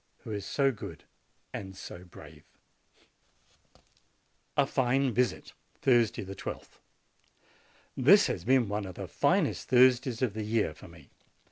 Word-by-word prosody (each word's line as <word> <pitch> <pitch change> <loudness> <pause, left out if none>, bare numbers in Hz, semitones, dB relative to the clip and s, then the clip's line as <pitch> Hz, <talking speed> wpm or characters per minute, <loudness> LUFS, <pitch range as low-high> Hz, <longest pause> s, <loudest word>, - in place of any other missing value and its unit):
who 110 - -7
is 100 -3 -4
so 135 +3 +2
good 110 - -9 0.5
and 95 -1 -7
so 90 - -9
brave! 80 -4 -14 2.1
A 140 - +5
FINE 135 -1 +1
VISIT 120 -2 -1 0.3
Thursday, 120 -4 +2
I2th. 95 0 -8 1.2
This - - +6
has 85 - -3
been 130 +1 +3
one 105 0 -3
of 90 - -9
the - - -6
finest - - 0
Thursdays 130 0 +4
of 120 -6 0
the 110 - -4
year 105 -6 0
for - - -14
me. 85 -4 -17
110 Hz, 130 wpm, -29 LUFS, 95-130 Hz, 2.1 s, This